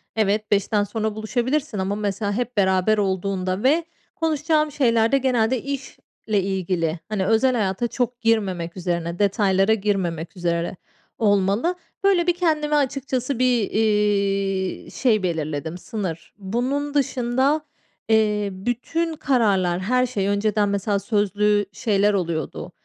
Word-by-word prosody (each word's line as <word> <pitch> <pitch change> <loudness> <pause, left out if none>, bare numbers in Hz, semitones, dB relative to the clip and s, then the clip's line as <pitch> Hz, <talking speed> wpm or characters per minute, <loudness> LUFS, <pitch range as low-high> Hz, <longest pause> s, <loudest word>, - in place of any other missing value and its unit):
evet, 215 0 0
17.00'den 205 +1 +2
sonra 215 +1 -3
buluşabilirsin 245 +4 -1
ama, 190 +1 -1
mesela, 205 0 -2
hep 245 +1 -3
beraber 190 +2 +3
olduğunda 190 -1 -1
ve 315 +6 +3 0.3
konuşacağım 310 -2 +1
şeylerde 235 -2 +3
genelde 250 -2 +1
iş 275 -1 -5 0.3
ile 210 -3 +2
ilgili, 180 -4 -1
hani, 205 -3 -1
özel 225 +5 +3
hayata 205 +2 0
çok 245 0 -2
girmemek 190 -7 0
üzerine, 170 -1 -2
detaylara 200 0 +3
girmemek 190 -5 -2
üzere 170 0 -1 0.4
olmalı. 205 - +2 0.3
Böyle, 375 -3 +3
bir 350 - +4
kendime 310 -4 +1
açıkçası 265 -2 -1
bir, 245 -5 +2
iii, 200 -3 0
şey 220 -7 +1
belirledim, 160 -1 -2
sınır. 180 -5 -5
Bunun 255 +9 -2
dışında, 265 +2 +1 0.5
eee, 210 -2 +2
bütün 250 - -2
kararlar, 200 - +1
her 250 +6 +1
şey 205 -6 -2
önceden, 205 0 +1
mesela, 200 0 0
sözlü 205 0 +1
şeyler 205 0 +1
oluyordu. 170 -6 -3
210 Hz, 125 wpm, -23 LUFS, 190-250 Hz, 0.5 s, bir